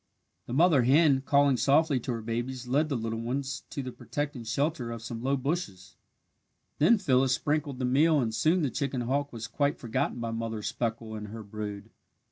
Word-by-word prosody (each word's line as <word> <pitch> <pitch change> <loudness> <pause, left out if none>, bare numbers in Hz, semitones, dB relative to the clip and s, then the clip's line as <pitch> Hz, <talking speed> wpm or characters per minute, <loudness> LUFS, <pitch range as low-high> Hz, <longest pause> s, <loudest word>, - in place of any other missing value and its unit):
The 120 - -5
mother 160 -1 +5
hen, 135 +2 +4
calling 140 -2 +4
softly 145 +1 +3
to 125 - -4
her 115 -1 -5
babies, 120 +3 -3
led 145 +5 +1
the 140 - 0
little 115 0 -3
ones 135 +3 -3
to 140 - -4
the 125 - -5
protecting 145 -1 -4
shelter 140 +2 -1
of 115 -1 -6
some 115 -1 -6
low 135 +2 +1
bushes. 130 - -4 0.8
Then 170 +10 +6
Phyllis 130 -8 +3
sprinkled 145 -1 -1
the 130 - -1
meal 150 +5 +4
and 115 -4 -1
soon 160 +10 +2
the 135 - 0
chicken 140 -2 -2
hawk 140 +4 -1
was 115 -2 -6
quite 140 +6 0
forgotten 125 +2 -2
by 115 -1 -3
Mother 115 -1 -4
Speckle 115 -1 -3
and 105 -1 -6
her 110 +1 -8
brood. 105 -1 -7
130 Hz, 190 wpm, -28 LUFS, 115-145 Hz, 0.8 s, Then